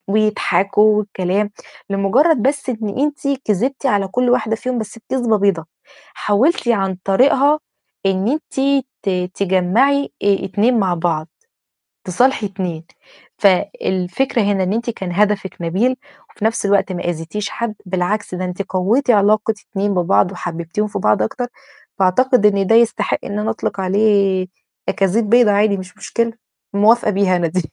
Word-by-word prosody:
ويضحكوا 210 0 +2
والكلام، 200 0 -1 0.4
لمجرد 225 - +2
بس 275 +2 0
إن 220 -2 -4
أنتِ 290 0 -1 0.2
كذبتِ 250 +7 -1
على 205 -6 +1
كل 245 +5 0
واحدة 225 -3 +1
فيهم 250 +2 -3
بس 220 +1 -7
كذبة 245 -4 +1
بيضة، 195 -5 +1 0.5
حاولتِ 240 +8 +1
عن 195 -5 +1
طريقها 275 +8 +3 0.5
إن 195 +1 +1
أنتِ 275 0 0 0.2
ت - - -1 0.3
تجمّعي 200 +9 +2 0.2
آآ 200 -1 +2
2 220 +5 +1
مع 190 -3 +1
بعض، 165 -2 -1 0.8
تصالحي 235 +5 +1
2. 180 -5 -5 0.5
فالفكرة 190 +4 +1
هنا 200 -1 +1
إن 185 +1 -1
أنتِ 235 +2 -2
كان 190 -5 -6
هدفِك 200 0 0
نبيل 195 +10 0 0.3
وفي 210 - -7
نفس 220 -2 0
الوقت 200 -1 +2
ما 180 - -5
أذيتيش 175 +5 -4
حد، 235 -2 -4
بالعكس 185 +2 -2
ده 185 +1 -3
أنتِ 180 +2 -3
قويتِ 200 +8 0
علاقة 215 0 +3 0.2
2 200 0 -1
ببعض 180 +1 +2
وحببتيهم 170 +3 -4
في - - -4
بعض 105 0 +2
أكتر، 245 - -2 0.5
فأعتقد 210 +5 +3
إن 200 -2 +2
ده 225 - +3
يستحق 235 0 +2
إن 200 +1 -4
أنا 215 +1 -1
أطلق 220 -3 -3
عليه 195 -1 +2 0.4
أكاذيب 205 +3 +1
بيضة 240 -2 +5
عادي 205 0 +2
مش 185 -1 -10
مشكلة، 230 0 -2 0.4
موافقة 215 +2 +4
بيها 195 -2 +2
أنا 175 -1 0
دي. 185 +3 -1
205 Hz, 145 wpm, -18 LUFS, 190-230 Hz, 0.8 s, بيضة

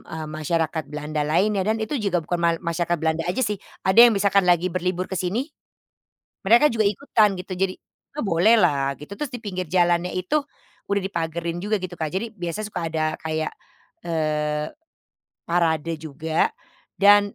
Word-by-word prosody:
eee, 160 -1 -6
masyarakat 160 0 -1
Belanda 150 0 -3
lainnya 195 +5 +2
dan 220 +1 +2
itu 220 +7 -3
juga 200 -5 0
bukan 175 +2 -2
mal 170 0 +3
masyarakat 170 0 -1
Belanda 160 0 0
aja 260 - -1
sih. 210 -3 -1 0.3
Ada 190 +4 +3
yang - - +2
misalkan 200 -1 +3
lagi 175 0 +3
berlibur 180 +1 -1
ke 190 - -2
sini 205 - -1 1.0
mereka 235 +8 +6
juga 220 -2 +1
ikutan 210 -1 +2
gitu 185 - -9
jadi 190 0 0 0.4
oh, - - -1
bolehlah 165 -7 +3
gitu. 150 +6 -10
Terus 295 -3 -4
di 245 - -5
pinggir 185 -3 -4
jalannya 175 0 +2
itu 185 +10 0 0.5
udah 200 - +2
dipagarin 170 -2 -3
juga 215 +1 +1
gitu, 185 -1 -5
Kak. 155 -2 -2
Jadi 210 +5 -1
biasa 175 +1 -4
suka 175 -5 -4
ada 155 -1 0
kayak, 160 0 -2 0.5
eee, 150 -2 -1 0.8
parade 165 -2 +1
juga 160 +1 0 0.5
dan, 205 0 +6
175 Hz, 165 wpm, -23 LUFS, 160-200 Hz, 1.0 s, mereka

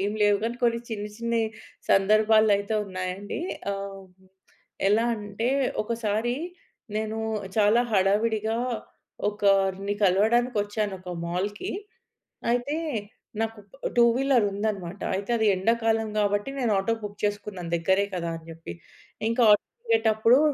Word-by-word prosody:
ఏం 205 +1 0
లేవు 205 -1 +4
గానీ 235 +1 -2
కొన్ని 235 -1 +2
చిన్న 210 -2 -3
చిన్న‌యి 235 -1 0 0.4
సందర్భాలు 215 +2 +5
అయితే 205 +2 -3
ఉన్నాయండి. 185 +3 -4 0.3
ఆహ్, 195 -1 -6 0.8
ఎలా 215 +3 +3
అంటే 210 +3 -3 0.3
ఒకసారి 230 +1 -1 0.6
నేను 220 0 -2 0.4
చాలా 215 +2 +5
హడావిడిగా 215 +3 +2 0.7
ఒకరిని 195 -1 +1
కలవడానికొచ్చాను 210 +1 +2
ఒక 185 -1 -8 0.2
మాల్‌కి. 200 - -3 0.8
అయితే 245 +5 0 0.7
నాకు 225 -1 -2 0.4
టూ 240 - +6
వీలర్ 260 -4 +3
ఉందన్నమాట 195 -3 -3
అయితే 200 +4 -3
అది 220 - +1
ఎండాకాలం 225 +3 +1
గాబట్టి 205 +3 +1
నేను 240 -4 +1
ఆటో 195 +4 0
బుక్ 205 0 -6
చేసుకున్నాను 205 -4 -4
దగ్గరే 190 +4 +2
కదా 170 -1 -2
అని 165 0 -10
జెప్పి. 165 0 -8 0.6
ఇంకా 230 +2 +1
ఆటో 210 - +4 0.2
దిగేటప్పుడు 240 - +4
210 Hz, 115 wpm, -26 LUFS, 195-225 Hz, 0.8 s, టూ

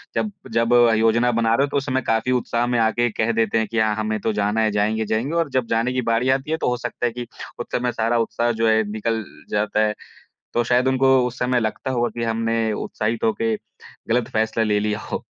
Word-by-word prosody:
जब 215 - 0 0.2
जब 115 +1 +2 0.2
योजना 115 +2 +3
बना 115 -1 +1
रहे 140 - +3
हो - - -8
तो - - +1
उस 135 - -1
समय 130 -1 0
काफ़ी 115 +3 +1
उत्साह 120 -1 0
में 125 - +1
आके 115 +2 +2
कह 110 +2 0
देते 115 -1 +1
हैं 110 -1 +1
कि 115 - 0
हाँ, 110 -1 +2
हमें 110 0 -2
तो 110 +2 -1
जाना 105 +2 0
है 110 - +2
जाएँगे, 110 +2 0
जाएँगे 115 +9 -1
और 165 -3 +1
जब 130 -3 -1
जाने 115 +3 +1
की 130 - 0
बारी 115 +3 +2
आती 135 +3 -8
है 160 - +1
तो - - 0
हो 125 - 0
सकता 120 - -4
है 120 - +1
कि 120 0 -6 0.3
उस - - -3
समय 125 0 0
सारा 115 +1 0
उत्साह 120 +1 0
जो 115 - +4
है 110 0 +3
निकल 110 +1 -2 0.3
जाता 105 +1 +1
है। 105 - -1 0.6
तो 120 - +2
शायद 125 +2 +2
उनको 130 0 +4
उस 125 +1 -8
समय 125 0 +1
लगता 110 +3 -3
होगा 120 -1 0
कि - - -1
हमने 115 0 0
उत्साहित 110 +2 -3
होके 110 0 +1 0.5
ग़लत 120 0 +1
फ़ैसला 110 +1 +1
ले 105 -1 +1
लिया 105 0 -1
हो। - - -3
115 Hz, 240 wpm, -22 LUFS, 110-125 Hz, 0.6 s, जो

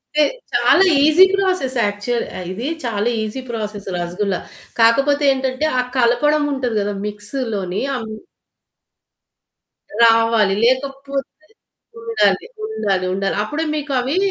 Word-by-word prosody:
అంటే 305 - +5 0.3
చాలా 385 - +4 0.2
EC 315 +5 +7
process 370 -10 0
actual 205 +4 -2 0.3
ఇది 225 +7 -5 0.2
చాలా 225 -1 -1
ఈసీ 220 +5 -4
ప్రాసెస్. 210 -3 -5
రసగుల్లా 180 +2 -2 0.4
కాకపోతే 275 +6 +3
ఏంటంటే 265 +2 -2
ఆ - - +4 0.2
కలపడం 290 +5 +2
ఉంటది 250 -4 -2
గదా! 205 0 -2
మిక్స్ 210 +4 -7 0.2
లోని 190 -1 -3
అమ్ 225 -3 -5 1.9
రావాలి. 225 -3 +4
లేకపోతే 275 +3 -2 0.5
ఉండాలి. 460 0 +1 0.2
ఉండాలి, 195 - -1
ఉండాలి. 195 0 -1
అప్పుడే 315 +6 -3
మీకవి 275 +1 -1
245 Hz, 110 wpm, -19 LUFS, 210-285 Hz, 1.9 s, ఈసీ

